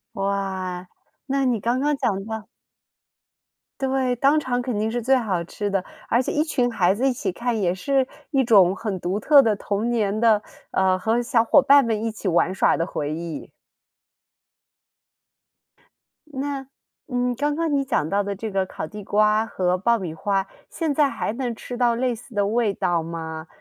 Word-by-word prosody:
哇， 190 Hz, -2 st, -3 dB, 0.4 s
那 275 Hz, 0 st, +1 dB
你 240 Hz, -4 st, +1 dB
刚 240 Hz, +5 st, 0 dB
刚 295 Hz, +1 st, +1 dB
讲 205 Hz, -8 st, -1 dB
到 220 Hz, -1 st, -6 dB, 1.3 s
对， 265 Hz, -1 st, +1 dB
当 275 Hz, +5 st, +4 dB
场 250 Hz, -4 st, 0 dB
肯 245 Hz, -4 st, -3 dB
定 220 Hz, +1 st, -1 dB
是 240 Hz, +1 st, -2 dB
最 265 Hz, +4 st, +3 dB
好 210 Hz, -9 st, 0 dB
吃 205 Hz, +4 st, -4 dB
的。 195 Hz, -2 st, -1 dB, 0.2 s
而 235 Hz, -, +3 dB
且 -, -, -3 dB
一 300 Hz, -, +2 dB
群 250 Hz, -6 st, 0 dB
孩 185 Hz, -5 st, +2 dB
子 255 Hz, +6 st, 0 dB
一 260 Hz, -, +2 dB
起 255 Hz, -6 st, -3 dB
看， 235 Hz, +2 st, -2 dB
也 175 Hz, -2 st, +1 dB
是 265 Hz, +8 st, +1 dB, 0.3 s
一 270 Hz, -3 st, +3 dB
种 195 Hz, -5 st, +5 dB
很 200 Hz, -4 st, -4 dB
独 180 Hz, +3 st, -2 dB
特 285 Hz, +4 st, +7 dB
的 220 Hz, -4 st, +2 dB
童 205 Hz, +4 st, -2 dB
年 215 Hz, -3 st, 0 dB
的， 220 Hz, -2 st, +4 dB, 0.3 s
嗯， 185 Hz, -1 st, +2 dB
和 225 Hz, +5 st, +1 dB
小 230 Hz, -1 st, +2 dB
伙 280 Hz, +4 st, +6 dB
伴 280 Hz, 0 st, +6 dB
们 220 Hz, -2 st, -1 dB
一 225 Hz, -, -1 dB
起 215 Hz, -2 st, -6 dB
玩 175 Hz, +1 st, +2 dB
耍 190 Hz, -, +3 dB
的 165 Hz, -, -1 dB
回 150 Hz, -4 st, -3 dB
忆。 165 Hz, -1 st, -6 dB, 2.8 s
那， 275 Hz, -1 st, -4 dB, 0.4 s
嗯， 250 Hz, -2 st, 0 dB
刚 290 Hz, +3 st, 0 dB
刚 330 Hz, -1 st, -1 dB
你 275 Hz, -, +2 dB
讲 270 Hz, -, 0 dB
到 200 Hz, +1 st, +1 dB
的 200 Hz, 0 st, -3 dB
这 215 Hz, +2 st, -5 dB
个 190 Hz, -1 st, 0 dB
烤 185 Hz, -, -6 dB
地 210 Hz, +4 st, -9 dB
瓜 215 Hz, +2 st, +2 dB
和 180 Hz, -4 st, 0 dB
爆 235 Hz, +5 st, +2 dB
米 180 Hz, -6 st, -5 dB
花， 195 Hz, +3 st, -1 dB, 0.2 s
现 320 Hz, -3 st, -2 dB
在 285 Hz, -1 st, +3 dB
还 215 Hz, -, -3 dB
能 240 Hz, -1 st, -3 dB
吃 245 Hz, +1 st, -7 dB
到 240 Hz, -2 st, +2 dB
类 250 Hz, 0 st, 0 dB
似 235 Hz, +1 st, -12 dB
的 205 Hz, -1 st, +2 dB
味 220 Hz, -1 st, +1 dB
道 175 Hz, -3 st, 0 dB
吗？ 160 Hz, -1 st, -6 dB
220 Hz, 200 characters per minute, -23 LUFS, 195-255 Hz, 2.8 s, 特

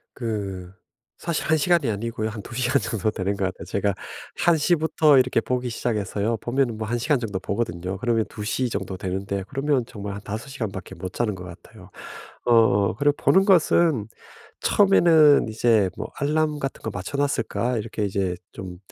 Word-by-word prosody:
그 100 Hz, -6 st, -4 dB, 0.5 s
사실 170 Hz, -3 st, -2 dB
1 160 Hz, -, +3 dB
시간이 160 Hz, -3 st, +2 dB
아니고요 110 Hz, +1 st, -2 dB
한 110 Hz, -1 st, -7 dB
2 120 Hz, -, -11 dB
시간 130 Hz, +2 st, +1 dB
정도 110 Hz, -2 st, -1 dB
되는 100 Hz, 0 st, -2 dB
것 100 Hz, -, 0 dB
같아요. 95 Hz, 0 st, -5 dB
제가 100 Hz, 0 st, 0 dB, 0.4 s
1 170 Hz, -2 st, +3 dB
시부터 155 Hz, -2 st, +3 dB
이렇게 130 Hz, -2 st, +2 dB
보기 125 Hz, 0 st, -2 dB
시작해서요 110 Hz, -1 st, -1 dB
보면은 120 Hz, +1 st, -1 dB
뭐 110 Hz, 0 st, -4 dB
1 120 Hz, +2 st, -1 dB
시간 140 Hz, +3 st, +1 dB
정도 105 Hz, -5 st, -3 dB
보거든요. 95 Hz, -2 st, -3 dB
그러면 115 Hz, 0 st, +1 dB
2 105 Hz, -, -7 dB
시 125 Hz, +3 st, -1 dB
정도 95 Hz, -2 st, -4 dB
되는데 95 Hz, +1 st, -3 dB
그러면 135 Hz, -3 st, 0 dB
정말 100 Hz, -3 st, -7 dB
한 100 Hz, -, -7 dB
5 110 Hz, +6 st, -6 dB
시간밖에 105 Hz, -8 st, -6 dB
못 90 Hz, +1 st, -7 dB
자는 110 Hz, -4 st, -1 dB
것 90 Hz, -, -9 dB
같아요. 95 Hz, +3 st, -13 dB, 0.6 s
어 105 Hz, -5 st, +4 dB
그리고 145 Hz, +5 st, +2 dB
보는 190 Hz, +1 st, +4 dB
것은 170 Hz, -, +3 dB, 0.5 s
처음에는 165 Hz, -, +5 dB
이제 110 Hz, -3 st, +2 dB
뭐 -, -, -5 dB
알람 150 Hz, +1 st, +1 dB
같은 135 Hz, -2 st, -4 dB
거 110 Hz, -, -3 dB
맞춰 100 Hz, +9 st, -5 dB
놨을까? 125 Hz, -3 st, 0 dB
이렇게 110 Hz, 0 st, -3 dB
이제 95 Hz, -2 st, -1 dB, 0.2 s
좀 90 Hz, -2 st, -8 dB
115 Hz, 335 characters per minute, -24 LUFS, 100-140 Hz, 0.6 s, 처음에는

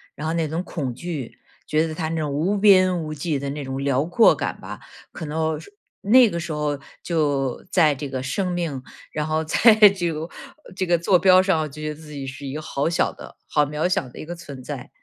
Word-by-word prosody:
然 150 Hz, -, -6 dB
后 160 Hz, -, -1 dB
那 165 Hz, -2 st, 0 dB
种 165 Hz, +4 st, -3 dB
恐 140 Hz, -9 st, -4 dB
惧， 155 Hz, -5 st, -6 dB, 0.3 s
觉 155 Hz, +1 st, +2 dB
得 160 Hz, -, -4 dB
它 160 Hz, 0 st, -3 dB
那 165 Hz, -, -2 dB
种 150 Hz, -2 st, -2 dB
无 170 Hz, +9 st, 0 dB
边 185 Hz, -3 st, +5 dB
无 155 Hz, 0 st, -5 dB
际 150 Hz, 0 st, -2 dB
的 140 Hz, 0 st, -4 dB
那 145 Hz, +1 st, -5 dB
种 135 Hz, +1 st, -4 dB
辽 140 Hz, 0 st, +1 dB
阔 175 Hz, +7 st, +5 dB
感 -, -, -4 dB
吧。 -, -, -8 dB, 0.3 s
可 160 Hz, -, -7 dB
能 160 Hz, +1 st, -1 dB
是 405 Hz, -, -14 dB, 0.3 s
那 240 Hz, +3 st, +6 dB
个 170 Hz, -, -3 dB
时 170 Hz, -2 st, -4 dB
候 150 Hz, -1 st, -2 dB, 0.2 s
就 145 Hz, -6 st, 0 dB
在 165 Hz, -5 st, +4 dB
这 145 Hz, +1 st, -5 dB
个 130 Hz, -1 st, -4 dB
生 180 Hz, +8 st, -1 dB
命， 165 Hz, -7 st, -3 dB, 0.3 s
然 150 Hz, 0 st, -2 dB
后 155 Hz, 0 st, 0 dB
在 220 Hz, +8 st, +5 dB, 0.2 s
这 175 Hz, -4 st, -2 dB
个 155 Hz, +2 st, -5 dB, 0.5 s
这 190 Hz, -, -1 dB
个 175 Hz, -1 st, +3 dB
座 180 Hz, +2 st, +3 dB
标 185 Hz, +1 st, +6 dB
上， 190 Hz, -4 st, +2 dB
我 155 Hz, -, -2 dB
就 150 Hz, +1 st, -10 dB
觉 155 Hz, -, -3 dB
得 150 Hz, -, -5 dB
自 155 Hz, 0 st, -13 dB
己 140 Hz, -2 st, -5 dB
是 135 Hz, +1 st, -8 dB
一 135 Hz, -, -5 dB
个 155 Hz, -, -4 dB
好 145 Hz, 0 st, -1 dB
小 170 Hz, -, +1 dB
的、 -, -, -12 dB
好 150 Hz, -1 st, +3 dB
渺 150 Hz, +4 st, -1 dB
小 160 Hz, -7 st, 0 dB
的 125 Hz, -, -13 dB
一 -, -, -7 dB
个 170 Hz, -, -6 dB
存 145 Hz, -7 st, -10 dB
在。 135 Hz, -2 st, -7 dB
155 Hz, 260 characters per minute, -23 LUFS, 145-175 Hz, 0.5 s, 那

